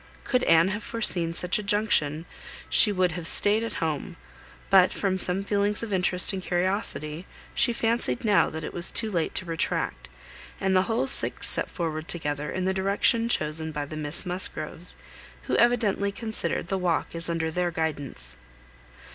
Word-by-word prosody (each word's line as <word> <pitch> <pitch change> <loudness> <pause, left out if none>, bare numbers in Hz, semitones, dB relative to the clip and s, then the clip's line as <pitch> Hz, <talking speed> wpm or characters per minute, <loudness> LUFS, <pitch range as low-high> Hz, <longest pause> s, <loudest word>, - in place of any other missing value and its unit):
Could 250 -1 +1
Anne 165 +3 +5
have 205 +2 -3
foreseen 175 -8 +1
such 180 +4 +1
a - - -5
junction, 200 -7 +1 0.5
she 210 - +6
would 185 -2 +1
have 165 -1 -4
staid 210 +6 +3
at 230 - -4
home; 160 +2 -3 0.6
but, 185 -1 +6
from 190 -2 -1
some 185 +2 +2
feelings 205 +1 +1
of 215 -3 -4
interest 180 +1 +2
and 190 - -3
curiosity, 180 -3 -1 0.3
she - - +2
fancied 230 - -1
now 210 -2 +4
that 160 0 -6
it - - -6
was 175 0 +4
too 220 -2 0
late 170 -4 -1
to 185 - 0
retract, 165 -1 -3 0.5
and 190 -1 +1
the 185 - +5
whole 235 +4 +1
six 270 - +1
set - - -1
forward 160 -2 -4
together 150 -4 -3
in 185 0 -2
the 190 - +1
direction 200 +4 +1
chosen 160 -4 0
by 150 -1 -4
the 150 - -8
Miss 150 +1 0
Musgroves, 180 -2 -4 0.5
who - - -1
evidently 220 -4 +2
considered 220 +1 -3
the 195 - -1
walk 175 -2 -1
as 165 0 0
under 165 -1 -1
their 180 +1 0
guidance. 160 -4 -4
180 Hz, 170 wpm, -26 LUFS, 160-205 Hz, 0.6 s, she